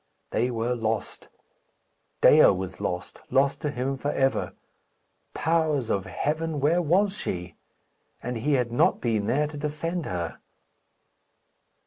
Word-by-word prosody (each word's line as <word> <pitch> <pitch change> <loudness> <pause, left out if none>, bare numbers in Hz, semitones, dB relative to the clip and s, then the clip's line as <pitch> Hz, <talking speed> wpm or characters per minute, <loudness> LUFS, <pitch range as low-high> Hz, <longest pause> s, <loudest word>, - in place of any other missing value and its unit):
They 120 +3 +1
were 120 0 -1
lost; 110 -3 -3 0.9
Dea - - +8
was 95 -1 -1
lost 90 0 -4
lost 140 +1 +2
to 150 - -1
him 135 0 -2
for 145 +2 -2
ever. 135 -2 0 0.8
Powers 160 -6 +1
of 95 -2 0
heaven! 155 +1 -2
where 160 +6 +3
was 190 +5 +2
she? 90 - -4 0.7
And 125 0 -3
he 145 +6 0
had 125 -3 +1
not 120 - +3
been 110 -4 0
there 150 +4 +2
to 150 0 -7
defend 155 +3 -3
her! 85 -2 -4
135 Hz, 130 wpm, -26 LUFS, 115-150 Hz, 0.9 s, Dea